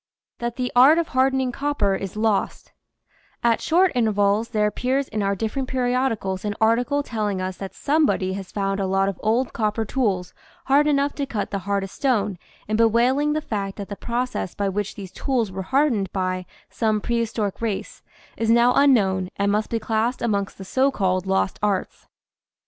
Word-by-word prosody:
THAT 235 Hz, 0 st, -3 dB
THE 250 Hz, -1 st, -2 dB
ART 270 Hz, +6 st, +7 dB
OF 335 Hz, -1 st, 0 dB
HARDENING 260 Hz, 0 st, +2 dB
COPPER 280 Hz, -7 st, 0 dB
IS 195 Hz, 0 st, -4 dB
LOST 215 Hz, -2 st, -1 dB, 0.7 s
T 230 Hz, -1 st, +4 dB
short 360 Hz, +2 st, +3 dB
intervals 215 Hz, -2 st, +1 dB
there 215 Hz, -3 st, +1 dB
appears 255 Hz, +6 st, 0 dB
in 215 Hz, -1 st, -3 dB
our 200 Hz, 0 st, +1 dB
different 225 Hz, +6 st, -3 dB
periodicals 245 Hz, -7 st, -1 dB
an 205 Hz, -1 st, -2 dB
article 245 Hz, +6 st, +2 dB
telling 210 Hz, -6 st, -2 dB
us 185 Hz, 0 st, -4 dB
that 195 Hz, -1 st, -7 dB
somebody 285 Hz, -11 st, +1 dB
has 195 Hz, -1 st, -7 dB
found 195 Hz, -1 st, -1 dB
a 195 Hz, -, 0 dB
lot 195 Hz, +1 st, +2 dB
of 195 Hz, -, -6 dB
old 230 Hz, +4 st, +1 dB
copper 220 Hz, 0 st, -1 dB
tools 200 Hz, -7 st, -1 dB, 0.3 s
hard 285 Hz, +2 st, +4 dB
enough 285 Hz, -1 st, +2 dB
to 280 Hz, -2 st, -3 dB
cut 215 Hz, -6 st, -3 dB
the 200 Hz, -, -1 dB
hardest 195 Hz, -1 st, -1 dB
stone 210 Hz, -9 st, 0 dB, 0.3 s
and 215 Hz, +1 st, -1 dB
bewailing 245 Hz, +6 st, +3 dB
the 310 Hz, -, -1 dB
fact 200 Hz, -7 st, -4 dB
that 200 Hz, -, -6 dB
the 205 Hz, -, -4 dB
process 240 Hz, -4 st, -3 dB
by 200 Hz, -, -1 dB
which 205 Hz, +1 st, -3 dB
these 190 Hz, -3 st, -8 dB
tools 245 Hz, -7 st, -1 dB
were 190 Hz, +1 st, -4 dB
hardened 235 Hz, -3 st, +1 dB
by 185 Hz, -1 st, -2 dB, 0.2 s
some 215 Hz, -2 st, 0 dB
prehistoric 225 Hz, -3 st, -2 dB
race 220 Hz, -4 st, -3 dB, 0.4 s
is 225 Hz, 0 st, -1 dB
now 235 Hz, +2 st, +5 dB
unknown 195 Hz, -10 st, +3 dB
and 200 Hz, 0 st, +1 dB
must 210 Hz, +1 st, 0 dB
be 230 Hz, -, 0 dB
classed 225 Hz, +2 st, -1 dB
amongst 200 Hz, -4 st, -1 dB
the 190 Hz, -, -8 dB
so 265 Hz, +7 st, +2 dB
called 185 Hz, -6 st, 0 dB
"lost 190 Hz, 0 st, 0 dB
arts." 205 Hz, -3 st, -2 dB
220 Hz, 180 wpm, -23 LUFS, 195-255 Hz, 0.7 s, ART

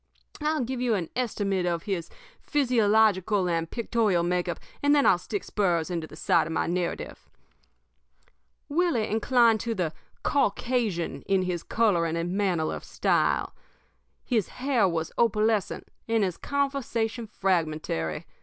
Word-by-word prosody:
"I'll 305 Hz, -2 st, +1 dB
give 250 Hz, +1 st, -3 dB
you 240 Hz, -3 st, +2 dB
an 175 Hz, -5 st, -3 dB
estimate 200 Hz, -7 st, -1 dB
of 170 Hz, -1 st, -1 dB
his 185 Hz, -5 st, -3 dB, 0.3 s
physiological 215 Hz, -, +2 dB
and 165 Hz, -1 st, -1 dB
pictorial 220 Hz, -6 st, +1 dB
make 180 Hz, 0 st, 0 dB
up, -, -, -3 dB, 0.2 s
and 285 Hz, +1 st, +4 dB
then 285 Hz, -, +4 dB
I'll 175 Hz, -, +5 dB
stick 205 Hz, +2 st, -4 dB
spurs 175 Hz, -5 st, 0 dB
into 165 Hz, -2 st, -3 dB
the -, -, -12 dB
sides 155 Hz, -, +2 dB
of 165 Hz, -, -4 dB
my -, -, 0 dB
narrative. 175 Hz, 0 st, -3 dB, 1.4 s
"Willie 305 Hz, -8 st, +1 dB
inclined 225 Hz, +1 st, +3 dB
to 230 Hz, 0 st, -2 dB
the 170 Hz, -5 st, -1 dB, 0.3 s
Caucasian 235 Hz, -, 0 dB
in 190 Hz, -1 st, +2 dB
his 180 Hz, -2 st, -2 dB
coloring 170 Hz, -8 st, +1 dB
and 170 Hz, +1 st, -2 dB
manner 185 Hz, -6 st, 0 dB
of -, -, -6 dB
style. -, -, +1 dB, 0.7 s
His 225 Hz, -7 st, +1 dB
hair 255 Hz, -6 st, +1 dB
was 165 Hz, -2 st, -2 dB
opalescent 215 Hz, -2 st, +1 dB, 0.2 s
and 225 Hz, -2 st, +2 dB
his 185 Hz, -3 st, -1 dB
conversation 255 Hz, -5 st, -2 dB
fragmentary. 155 Hz, -, -1 dB
205 Hz, 140 wpm, -27 LUFS, 175-235 Hz, 1.4 s, I'll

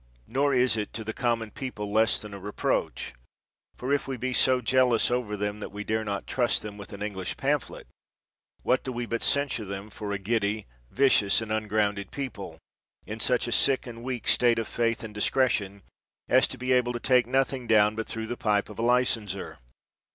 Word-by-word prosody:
Nor 140 Hz, +4 st, +1 dB
is 125 Hz, -2 st, +3 dB
it 105 Hz, -, -3 dB
to 110 Hz, -, -4 dB
the 110 Hz, +1 st, -4 dB
common 115 Hz, -3 st, -1 dB
people 105 Hz, -6 st, -5 dB
less 110 Hz, +1 st, +3 dB
than 105 Hz, -1 st, -9 dB
a 100 Hz, -, -7 dB
re 105 Hz, +2 st, -6 dB
proach; -, -, -1 dB, 0.7 s
for 130 Hz, +3 st, -1 dB
if 145 Hz, -, 0 dB
we 135 Hz, -1 st, -3 dB
be 130 Hz, +2 st, -2 dB
so 130 Hz, 0 st, +4 dB
jealous 125 Hz, -2 st, +3 dB
over 120 Hz, -4 st, -1 dB
them 105 Hz, +1 st, -2 dB
as -, -, -13 dB
that -, -, -6 dB
we 105 Hz, +1 st, -5 dB
dare 110 Hz, +1 st, -1 dB
not 100 Hz, -2 st, -3 dB
trust 120 Hz, -2 st, 0 dB
them 105 Hz, -1 st, -7 dB
with 100 Hz, -1 st, -10 dB
an 100 Hz, 0 st, -6 dB
English 95 Hz, -3 st, -4 dB
pamphlet, -, -, -1 dB, 0.8 s
what 130 Hz, -, +2 dB
do 130 Hz, -, -4 dB
we 120 Hz, -1 st, -3 dB
but 115 Hz, 0 st, -2 dB
censure 140 Hz, -5 st, +1 dB
them 100 Hz, +1 st, -7 dB
for 105 Hz, 0 st, -5 dB
a 100 Hz, -, 0 dB
giddy, 105 Hz, +1 st, -1 dB, 0.2 s
vicious, 125 Hz, -, +4 dB
and 110 Hz, -1 st, -5 dB
ungrounded 105 Hz, -2 st, 0 dB
people, 100 Hz, -, -6 dB, 0.5 s
in 105 Hz, +2 st, -6 dB
such 125 Hz, +1 st, +1 dB
a -, -, -3 dB
sick 135 Hz, +2 st, +3 dB
and 115 Hz, -2 st, -8 dB
weak 125 Hz, -1 st, -4 dB
state 120 Hz, -1 st, +4 dB
of 115 Hz, -, -1 dB
faith 115 Hz, -1 st, -1 dB
and 110 Hz, -1 st, -7 dB
discretion, 105 Hz, -4 st, 0 dB, 0.4 s
as -, -, +5 dB
to -, -, -7 dB
be 125 Hz, +1 st, -2 dB
able 125 Hz, -1 st, +2 dB
to 120 Hz, -, -3 dB
take 125 Hz, -1 st, +3 dB
nothing 130 Hz, -1 st, 0 dB
down 105 Hz, -1 st, +5 dB
but 115 Hz, 0 st, -4 dB
through 110 Hz, 0 st, -4 dB
the 120 Hz, +2 st, -4 dB
pipe 105 Hz, -4 st, 0 dB
of 105 Hz, -, -10 dB
a -, -, 0 dB
licenser 115 Hz, -5 st, +1 dB
115 Hz, 210 wpm, -27 LUFS, 105-125 Hz, 0.8 s, as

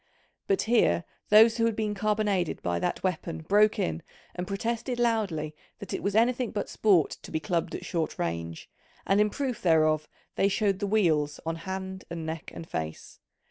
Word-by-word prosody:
But 390 Hz, -1 st, +2 dB
here 155 Hz, -, +3 dB, 0.3 s
those 225 Hz, +2 st, +7 dB
who 230 Hz, -, +2 dB
had 230 Hz, -2 st, +1 dB
been 215 Hz, -1 st, -1 dB
carbonaded 205 Hz, -3 st, 0 dB
by 85 Hz, -1 st, 0 dB
that -, -, -2 dB
weapon 170 Hz, -3 st, -2 dB
broke 210 Hz, +5 st, +4 dB
in 80 Hz, -1 st, -1 dB, 0.3 s
and 180 Hz, 0 st, -5 dB
protested 230 Hz, +5 st, -2 dB
loudly 195 Hz, -11 st, 0 dB, 0.2 s
that 200 Hz, -, -8 dB
it -, -, -2 dB
was 200 Hz, 0 st, -1 dB
anything 240 Hz, +1 st, +3 dB
but 205 Hz, -, -3 dB
sport 190 Hz, -8 st, +3 dB
to -, -, -10 dB
be 160 Hz, -, -1 dB
clubbed 165 Hz, +2 st, -1 dB
at -, -, -6 dB
short 165 Hz, -3 st, -2 dB
range, 85 Hz, -1 st, -4 dB, 0.4 s
and 195 Hz, +1 st, +3 dB
in 210 Hz, -, +3 dB
proof 260 Hz, 0 st, -3 dB
thereof 155 Hz, -3 st, +3 dB, 0.3 s
they 195 Hz, -, +4 dB
showed 200 Hz, -1 st, +1 dB
the 205 Hz, -, -1 dB
weals 160 Hz, -8 st, +2 dB
on 165 Hz, 0 st, -1 dB
hand 190 Hz, +2 st, -6 dB
and 165 Hz, -1 st, -5 dB
neck 160 Hz, 0 st, -5 dB
and 165 Hz, -, -9 dB
face. 80 Hz, -, -6 dB
190 Hz, 180 wpm, -28 LUFS, 160-215 Hz, 0.4 s, those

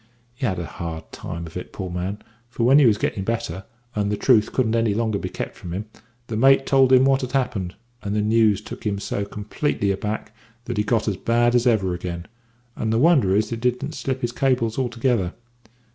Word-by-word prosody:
He 125 Hz, +1 st, -2 dB
had 95 Hz, -4 st, -1 dB
a 85 Hz, -, -3 dB
hard 80 Hz, +3 st, -7 dB
time 85 Hz, 0 st, -6 dB
of 80 Hz, -, -11 dB
it, 90 Hz, -, -6 dB
poor 95 Hz, -3 st, -5 dB
man, 90 Hz, +4 st, -4 dB, 0.3 s
for 120 Hz, -1 st, -3 dB
when 135 Hz, +5 st, +6 dB
he 140 Hz, -, +6 dB
was 105 Hz, -3 st, +4 dB
getting 95 Hz, -, -2 dB
better, 95 Hz, -4 st, -3 dB, 0.3 s
and 105 Hz, -1 st, 0 dB
the 105 Hz, -, -1 dB
truth 110 Hz, -4 st, +3 dB
couldn't 115 Hz, -4 st, +1 dB
any 115 Hz, -3 st, +2 dB
longer 110 Hz, -2 st, 0 dB
be -, -, -4 dB
kept -, -, -5 dB
from 85 Hz, -, -8 dB
him, 100 Hz, +3 st, -4 dB, 0.4 s
the 115 Hz, -, -5 dB
mate 135 Hz, +4 st, +5 dB
told 135 Hz, -1 st, +4 dB
him 130 Hz, 0 st, +7 dB
what 135 Hz, 0 st, +3 dB
had 130 Hz, 0 st, -5 dB
happened, 105 Hz, -9 st, -1 dB, 0.3 s
and 100 Hz, 0 st, -3 dB
the 105 Hz, -, +2 dB
news 110 Hz, -1 st, +3 dB
took -, -, -9 dB
him 100 Hz, -2 st, -1 dB
so 100 Hz, 0 st, -3 dB
completely 105 Hz, +1 st, -2 dB
aback 105 Hz, +2 st, -4 dB, 0.3 s
that 120 Hz, -2 st, -4 dB
he 105 Hz, -, +2 dB
got 110 Hz, +1 st, 0 dB
as 100 Hz, -3 st, 0 dB
bad 120 Hz, +4 st, +2 dB
as 125 Hz, 0 st, +3 dB
ever 100 Hz, -6 st, +2 dB
again, 85 Hz, -1 st, -5 dB, 0.5 s
and 110 Hz, -, -2 dB
the 115 Hz, -, +2 dB
wonder 135 Hz, -, +4 dB
is 105 Hz, +2 st, +1 dB
that 115 Hz, 0 st, -4 dB
he 125 Hz, -, +5 dB
didn't 125 Hz, +5 st, -6 dB
slip 130 Hz, -2 st, -3 dB
his 120 Hz, -, -1 dB
cables 125 Hz, -3 st, 0 dB
altogether. 120 Hz, -6 st, 0 dB
110 Hz, 220 wpm, -23 LUFS, 100-125 Hz, 0.5 s, him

